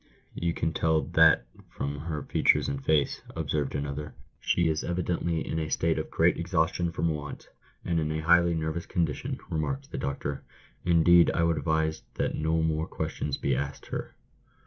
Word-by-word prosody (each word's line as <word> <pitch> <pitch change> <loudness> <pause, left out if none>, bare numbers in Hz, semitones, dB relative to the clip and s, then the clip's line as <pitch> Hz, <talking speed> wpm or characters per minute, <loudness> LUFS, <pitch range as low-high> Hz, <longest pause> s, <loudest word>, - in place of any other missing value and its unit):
"You 85 0 -1
can 80 0 -1
tell 80 -1 +2
that - - +5 0.2
from 70 +1 -4
her 75 -1 -4
features - - +3
and 70 -1 -3
face," 75 -2 +1
observed 75 -3 -1
another. 70 +1 -4
" - - -41
She 85 -1 +2
is 80 -1 0
evidently 85 -2 -1
in 80 - -1
a 80 -1 -3
state 80 +1 +1
of - - -4
great - - +3
exhaustion 85 0 0
from 85 0 0
want, 75 -2 -5 0.4
and 85 -2 +1
in 75 -1 -1
a 80 0 -2
highly 85 +1 +5
nervous 80 +1 -3
condition," 80 -4 -1
remarked 70 -4 -2
the - - -4
doctor. 70 0 -3 0.4
"Indeed, 85 0 +6
I 85 - +2
would 85 -1 +2
advise 80 +1 0
that - - -1
no 80 +1 0
more 80 0 0
questions 70 -2 -3
be 70 - 0
asked 70 +2 -4
her." - - -5
80 Hz, 175 wpm, -28 LUFS, 75-85 Hz, 0.4 s, Indeed